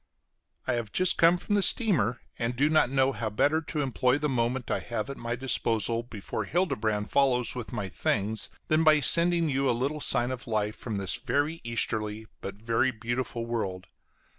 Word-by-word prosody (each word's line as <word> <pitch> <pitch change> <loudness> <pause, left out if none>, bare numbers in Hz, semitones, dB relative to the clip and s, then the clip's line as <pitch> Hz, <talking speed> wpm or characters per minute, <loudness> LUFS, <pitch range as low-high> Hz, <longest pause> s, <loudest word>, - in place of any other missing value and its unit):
I - - 0
have 115 -3 -3
just 185 0 +2
come 170 +1 +6
from 205 - -4
the 205 - +3
steamer, 175 - +3 0.2
and 120 +1 -1
do 145 +5 +2
not 155 -5 +4
know 135 0 +2
how 115 -4 -3
better 145 +9 +1
to 155 -1 -3
employ 130 -1 +1
the 150 +1 -1
moment 125 -1 -1
I - - +1
have 120 +3 -4
at 140 - -8
my 120 0 -3
disposal 115 -3 0
before 115 -4 -5
Hildebrand 110 - -1
follows 125 -4 +2
with 120 -3 -6
my 100 - -3
things, 105 +3 -1 0.2
than 155 +1 +3
by 155 -1 +5
sending 170 +2 +4
you 135 -2 +1
a 120 - +1
little 145 +5 -2
sign 120 -1 0
of 130 +1 -6
life 105 -1 -1
from 115 -4 -5
this 95 -2 -2
very 150 +3 -1
easterly 110 -2 -1 0.2
but 100 - -6
very 115 +4 +1
beautiful 120 0 -3
world. 100 -6 -3
120 Hz, 190 wpm, -28 LUFS, 110-145 Hz, 0.2 s, come